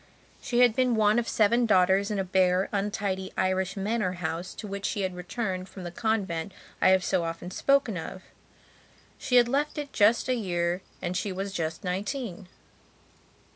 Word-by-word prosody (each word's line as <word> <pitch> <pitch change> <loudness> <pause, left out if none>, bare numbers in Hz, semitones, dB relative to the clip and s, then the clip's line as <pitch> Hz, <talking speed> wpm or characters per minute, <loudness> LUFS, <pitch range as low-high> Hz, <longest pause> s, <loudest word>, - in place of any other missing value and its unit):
She 240 0 +1
had 240 -3 +5
been 255 -2 +2
one 215 +1 +4
of 235 - -3
seven 235 +3 +3
daughters 190 0 +4
in 210 - -2
a 195 - 0
bare, 185 0 +2
untidy 195 -2 -2
Irish 185 +1 0
manor 205 -1 -1
house 175 0 -4
to - - -7
which 200 -1 -5
she 205 - -1
had 185 -1 -2
returned 185 0 -4
from 190 - -9
the 175 - -5
convent 195 -5 -1 0.3
I - - +6
have 190 -1 +4
so 185 -2 +1
often 165 +2 -5
spoken 275 -4 +2
of. 185 +3 -7 1.0
She 265 -4 -1
had 240 -1 +7
left 290 +5 0
it 290 -1 -5
just 215 +4 +4
a 255 - +2
year 175 -5 -1 0.2
and 180 0 -2
she 195 +2 -1
was 195 +1 -4
just 160 -3 -3
nineteen. 195 +1 -4
195 Hz, 175 wpm, -27 LUFS, 185-225 Hz, 1.0 s, had